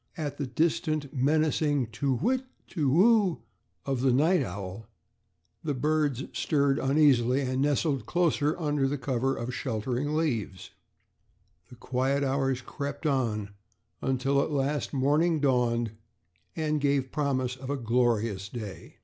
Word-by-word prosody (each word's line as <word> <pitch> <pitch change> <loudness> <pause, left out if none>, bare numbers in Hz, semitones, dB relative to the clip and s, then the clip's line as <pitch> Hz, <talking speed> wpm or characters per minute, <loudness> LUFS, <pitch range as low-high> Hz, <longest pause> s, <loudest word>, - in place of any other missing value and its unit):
At 145 -2 -4
the 140 - -2
distant 155 +1 0
menacing 145 -1 +1
"Tu 135 +3 0
whit, 245 - +1 0.3
tu 150 -6 -1
whoo" 195 - +4 0.4
of 135 -3 -1
the 130 0 +3
night 160 +8 +3
owl, 100 +3 -6 0.8
the 150 -3 -1
birds 145 -1 0
stirred 140 -2 +1
uneasily 135 -2 +3
and 130 0 -1
nestled 140 -4 0
closer 165 -3 +1
under 145 -3 0
cover 135 0 -1
of 120 - -4
the 125 - -4
sheltering 130 +4 -2
leaves. 115 - -2 1.0
The - - -12
quiet 130 +3 0
hours 135 -1 0
crept 145 +3 -6
on 115 -8 0 0.7
till 135 +2 +2
at - - -1
last 145 0 -1
morning 150 +4 +2
dawned 120 -5 +1 0.6
and 155 -2 -1
gave 140 -2 +1
promise 130 -4 -1
of 130 0 -9
a 145 - -1
glorious 115 -5 0
day. 105 -5 -8
135 Hz, 130 wpm, -28 LUFS, 125-150 Hz, 1.0 s, whoo